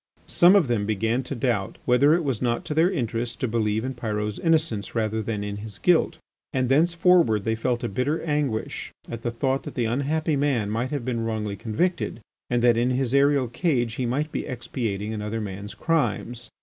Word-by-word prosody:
Some 175 +3 +5
of 185 -8 +4
them 110 -4 0
began 110 +4 0
to 135 +2 -6
doubt 115 -6 -1
whether 140 +5 +5
it 175 - 0
was 135 -7 -1
not 120 -2 0
to - - -3
their 165 +3 +4
interest 120 - -2
to 130 - 0
believe 110 0 0
in 130 - -3
Pyrot's 105 -3 -3
innocence 155 - +1
rather 110 -1 0
than 105 -1 -3
in 100 0 -4
his 105 -1 -8
guilt, 175 -2 +2 0.3
and 130 -3 0
thenceforward 165 - +4
they 110 - 0
felt 120 +2 -1
a - - 0
bitter 125 +10 -1
anguish 145 -8 -2 0.2
at 115 -1 -6
the 120 - -1
thought 130 +3 0
that - - -9
the 120 - 0
unhappy 145 +6 0
man 135 -7 0
might 115 +4 -1
have 140 -5 -3
been 120 -3 -1
wrongly 110 -2 -2
convicted 120 - -1 0.3
and 120 -1 +1
that 120 -1 +5
in 120 +2 +2
his 130 -1 0
aerial 140 -1 +4
cage 120 -3 0
he 125 +1 -2
might 145 +6 -1
be - - -3
expiating 115 -4 -3
another 105 +1 -3
man's 100 -1 -6
crimes. 125 -7 -1
120 Hz, 200 wpm, -25 LUFS, 110-140 Hz, 0.3 s, Some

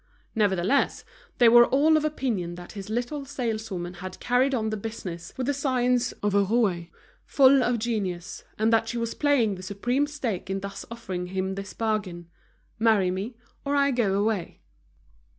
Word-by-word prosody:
Nevertheless, 205 +3 +1 0.3
they 240 - +6
were 240 +1 +8
all 300 +4 +4
of 310 - +2
opinion 235 - -2
that 175 0 -10
this 200 -1 -8
little 245 +6 -2
saleswoman 220 -9 -4
had 185 +1 -8
carried 255 +2 +2
on 220 -2 -1
the - - -1
business 195 -6 -6
with 260 - -2
the 285 - +1
science 250 -3 +1
of 205 -1 +1
a 200 0 +4
rouée, 195 -5 0 0.3
full 270 -1 +5
of 245 -1 +1
genius, 200 -6 -3
and 220 +1 +2
that 225 0 +2
she 240 - -3
was 230 -1 -2
playing 275 -8 +2
the 185 - -8
supreme 240 +9 -1
stake 235 -11 -4
in 195 0 -2
thus 200 0 -7
offering 190 -6 -5
him 190 +1 -2
this 195 0 -7
bargain: 185 -7 -2 0.5
Marry 215 -5 +3
me 200 +7 -4 0.3
or 285 0 -1
I 280 0 +3
go 225 -6 +1
away. 210 -4 -2
220 Hz, 170 wpm, -26 LUFS, 190-250 Hz, 0.5 s, were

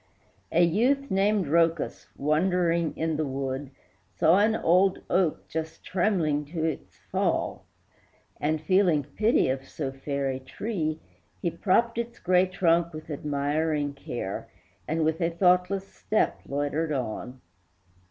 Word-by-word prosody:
A 170 - +4
youth 255 - +2
named 195 0 +2
Rhœcus, 165 +1 +1
wandering 170 +2 +1
in 160 -1 -1
the 155 - 0
wood, 135 0 -3 0.5
Saw 170 +5 +5
an 215 +2 +3
old 185 +1 +3
oak 180 -4 +1
just 160 0 -5
trembling 175 -6 +1
to 160 +2 -3
its 160 - -4
fall, - - 0 0.7
And, 155 +1 0
feeling 170 -2 +3
pity 215 - +2
of 135 +1 -3
so 140 -4 -4
fair 140 +1 -3
a 130 - -4
tree, 155 - -3 0.4
He 170 - -1
propped 230 +7 +1
its 235 0 -4
gray 180 +1 +3
trunk 170 -2 +2
with 155 0 -8
admiring 145 +1 -1
care, 120 -7 -5 0.4
And 160 0 0
with 160 +2 0
a 165 - +2
thoughtless 180 +2 +2
footstep 215 +2 -1
loitered 145 +3 -1
on. 125 -1 -4
165 Hz, 135 wpm, -27 LUFS, 145-185 Hz, 0.7 s, Saw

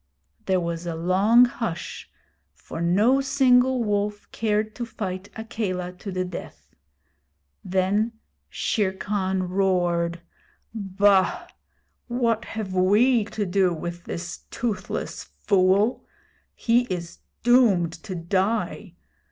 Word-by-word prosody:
There 190 -1 +3
was 170 0 -4
a 170 - -3
long 195 +8 +5
hush, 225 -8 -5 0.5
for 165 - -8
no 210 +11 +3
single 260 -2 +3
wolf 205 -1 -1
cared 215 -1 0
to 240 - -3
fight 200 -4 -5
Akela 205 -6 -3
to 195 +2 -8
the 185 0 -1
death. 180 -1 -9 0.9
Then 190 +5 +1 0.4
Shere 200 -4 0
Khan 190 -1 -1
roared: 175 -2 0 0.5
'Bah! 200 - +2 0.6
what 235 -2 0
have 215 -4 -5
we 210 +6 +4
to 210 0 -3
do 185 -1 +2
with 175 +2 -6
this 175 +1 -5
toothless 220 -5 -3
fool? 200 +3 +1 0.5
He 240 +1 +2
is 175 -5 -5 0.2
doomed 220 -9 +4
to 190 -3 -6
die! 190 +6 -1
200 Hz, 110 wpm, -24 LUFS, 185-225 Hz, 0.9 s, long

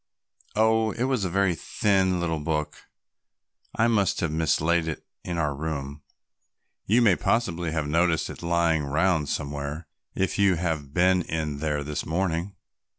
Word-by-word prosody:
"Oh, 110 +1 +3
it 120 - -2
was 130 -6 0
a - - -1
very 95 0 +2
thin 95 +1 +1
little 80 -2 -1
book; 75 0 -3 0.9
I 115 - +3
must 105 -5 +2
have 85 - 0
mislaid 80 +1 +1
it 80 - -5 0.2
in 85 -1 -4
our 75 -3 0
room. 70 -1 -5 0.9
You 120 +4 +4
may 100 -5 +5
possibly 90 -8 0
have 80 -2 -1
noticed 85 +1 +2
it - - -9
lying 85 -2 +1
round 80 +1 +1
somewhere 70 +2 -4 0.3
if 95 +1 -1
you 100 -2 +4
have 80 -5 -2
been 90 +3 +3
in 80 -3 -3
there 75 -1 -1
this 75 +1 -3
morning." 85 +2 -2
85 Hz, 150 wpm, -26 LUFS, 75-95 Hz, 0.9 s, may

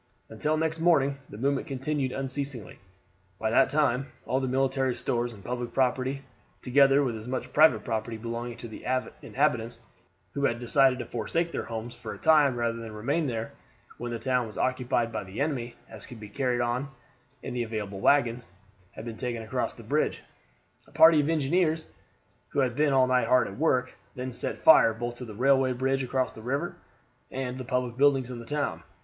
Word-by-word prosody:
Until 150 +8 -1
next 160 0 -1
morning 140 -5 +3
the 105 - -9
movement 135 +3 0
continued 135 0 -2
unceasingly; 135 -4 -4 0.6
by 110 +1 -1
that - - +4
time 140 -3 +1 0.2
all 130 - 0
the 130 - -2
military 135 0 +1
stores 120 0 -1
and 100 -4 -13
public 120 -1 -4
property, 130 +1 0 0.4
together 140 +2 +5
with 125 -4 -1
as 110 +1 -8
much 130 0 -4
private 155 +1 +5
property 115 0 -3
belonging 115 +1 -5
to 125 +3 -3
inhabitants 125 -5 0 0.6
who 140 0 0
had 120 - +1
decided 130 +2 +4
to 125 - -5
forsake 165 +9 -2
their - - -3
homes 115 +1 -5
for - - -7
a - - -12
time 150 -5 +4
rather 115 -1 -1
than 115 - -7
to - - -8
remain 140 +9 -1
there 115 -2 -3 0.5
when 120 0 -4
the 120 - -2
town 125 0 0
was 110 - -10
occupied 125 -2 0
by 110 - -3
the 95 +2 -8
enemy, 130 -5 -2
as - - -9
could 125 -4 -10
be 105 -1 -9
carried 125 +1 0
on 120 +3 -1 0.5
in - - -5
the 125 - -1
available 105 -4 -4
wagons, 125 -2 +2 0.5
had 110 - -9
been 115 -2 -6
taken 120 -2 -3
across 110 - -2
the - - -13
bridge. - - 0 0.6
A - - -20
party 160 -1 +7
of 145 - -1
engineers, 160 +1 +1 0.6
who - - 0
had 125 -2 0
been 150 0 +2
all 130 -1 +5
night 130 0 +2
hard 125 -1 +4
at 100 - -8
work, 130 -5 +1 0.2
then 130 +1 -4
set - - -2
fire 115 - +6
both 120 +1 -4
to 125 - -6
the 110 -3 -9
railway 130 +2 +3
bridge 135 +2 0
across 130 0 -1
the 110 - -11
river 130 +5 -2 0.5
and 130 -1 -4
the - - -4
public 125 -2 -2
buildings 135 -2 +3
in 120 - -6
the 115 - -9
town. 140 - -2
125 Hz, 195 wpm, -28 LUFS, 120-140 Hz, 0.6 s, party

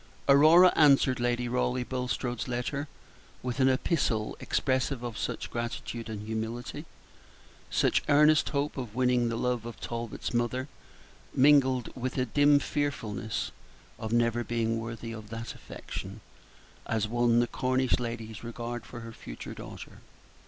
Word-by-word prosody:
Aurora 155 +6 +7
answered 140 -4 +5
Lady 120 0 0
Raleigh 125 +1 0
Bulstrode's 125 -1 -3
letter 125 +4 -2 0.6
with 125 +1 -3
an 130 0 +5
epistle 130 -5 0
expressive 130 -1 0
of 120 -2 -4
such - - -4
gratitude 120 -1 -4
and 105 -1 -5
humility, 115 +7 -4 0.8
such - - +2
earnest 150 +2 +5
hope 145 0 -1
of 120 -5 -5
winning 125 -1 +2
the 115 - -2
love 125 -1 0
of 120 0 -8
Talbot's 115 0 -4
mother, 120 +3 0 0.7
mingled 130 -3 +4
with 130 +1 -3
a 130 - +2
dim 145 +4 +5
fearfulness 140 -8 -2 0.5
of 110 - -4
never 120 0 +2
being 115 -1 -1
worthy 115 0 -6
of 110 -2 -8
that 115 +1 -5
affection, 100 +3 -8 0.7
as 110 -2 0
won 120 +1 +3
the 120 - +4
Cornish 130 +1 +1
lady's 115 -3 -5
regard 120 +1 -5
for 120 - -8
her 115 0 -8
future - - -8
daughter. - - -10
120 Hz, 140 wpm, -29 LUFS, 115-130 Hz, 0.8 s, Aurora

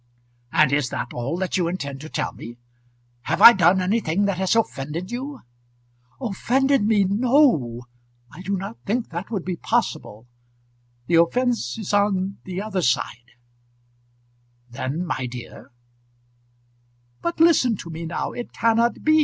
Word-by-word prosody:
"And 155 -2 +3
is 140 -3 +1
that 120 -2 -5
all 130 +8 -3
that 190 0 -1
you 175 -2 +1
intend 140 -6 -4
to 155 - -9
tell - - -3
me? 120 +2 -10 0.7
Have - - -1
I 235 - +11
done 185 -1 +4
anything 195 -1 0
that 200 -2 -1
has 190 +3 +1
offended 170 - -2
you?" 270 +4 -5 0.8
"Offended 265 +4 +1
me! 215 -2 +4
No. 200 - +2 0.5
I 160 - -11
do 195 +1 -2
not 195 +5 -7
think 225 +3 -2
that 170 +3 -5
would 205 -6 -3
be 180 -2 -3
possible. 110 -7 -2 0.8
The 165 -1 +5
offence 235 - 0
is 210 -2 -5
on 200 -1 +1
the 185 0 -5
other 200 -4 -2
side 120 -3 -1 0.7
" 120 0 -40
"Then, 140 +7 -3
my 130 -7 -3
dear, 120 0 -10 0.8
" 120 0 -40
"But 340 - -3
listen 290 - +4
to 170 - -8
me 165 +1 -6
now. 170 - -3
It 240 - -7
cannot 230 +1 +1
be. 310 0 +4
180 Hz, 155 wpm, -23 LUFS, -, 0.8 s, I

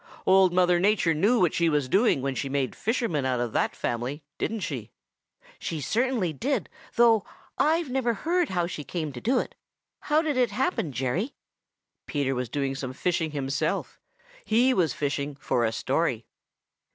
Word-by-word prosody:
Old 190 -1 +5
Mother 180 -1 +3
Nature 195 -3 +3
knew 210 +10 +3
what 175 -4 +3
she 170 -1 +2
was 145 -4 +1
doing 195 - +3
when 135 -1 0
she 135 +1 -3
made 135 -1 -1
fishermen 220 - -1
out 130 -2 0
of 120 -2 -2
that - - 0
family, 125 +6 -3 0.2
didn't 225 -1 -2
she?" 125 - -4 0.7
"She 160 - -3
certainly 225 - 0
did, 250 - -1 0.3
though 230 -3 +5 0.4
I've 315 -2 +2
never 245 -3 +1
heard 345 - 0
how 175 -2 0
she 165 -3 -5
came 155 -1 -4
to 120 - -8
do 250 +3 +2
it. - - -2 0.5
How 305 +2 +2
did 300 -4 -1
it 250 -1 +3
happen, 260 - -1
Jerry?" 135 - -2 0.7
Peter 140 -3 0
was 125 -2 -3
doing 140 -2 -1
some 130 -2 -5
fishing 165 +2 0
himself. 140 -1 -2 0.4
He 245 +4 +3
was 170 - +2
fishing 145 0 -2
for 125 -3 0
a 110 - +2
story. 115 - -1
170 Hz, 170 wpm, -27 LUFS, 140-230 Hz, 0.7 s, Old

